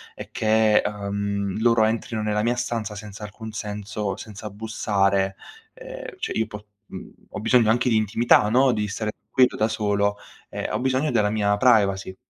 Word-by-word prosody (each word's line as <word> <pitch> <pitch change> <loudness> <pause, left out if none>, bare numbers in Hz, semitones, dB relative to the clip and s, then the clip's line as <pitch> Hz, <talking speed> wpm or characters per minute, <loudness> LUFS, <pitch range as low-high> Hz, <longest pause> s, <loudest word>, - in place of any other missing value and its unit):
è - - -9
che, 110 0 +3
uhm, 100 -1 -3
loro 115 -1 +4
entrino 110 0 -2
nella 105 0 0
mia 120 +3 +1
stanza 115 -4 -3
senza 105 0 -9
alcun 110 +1 -8
senso, 105 -2 -4
senza 105 0 -8
bussare, 100 -2 0 0.4
ehm, - - -9
cioè - - -4
io 110 -1 0
po 105 -1 -10 0.2
uhm, - - -10 0.2
ho - - -6
bisogno 115 0 +4
anche 120 +2 +2
di 115 - +2
intimità, 110 0 +3
no, 130 +3 +4
di 105 -3 -1
stare 105 +1 -3 0.2
tranquillo 125 +2 +3
da 110 - +1
solo, 105 -2 0 0.3
ehm, - - -5
ho 110 - -1
bisogno 130 +4 0
della 105 -4 +2
mia 105 -1 +1
privacy. 100 -5 +2
110 Hz, 170 wpm, -24 LUFS, 105-115 Hz, 0.4 s, loro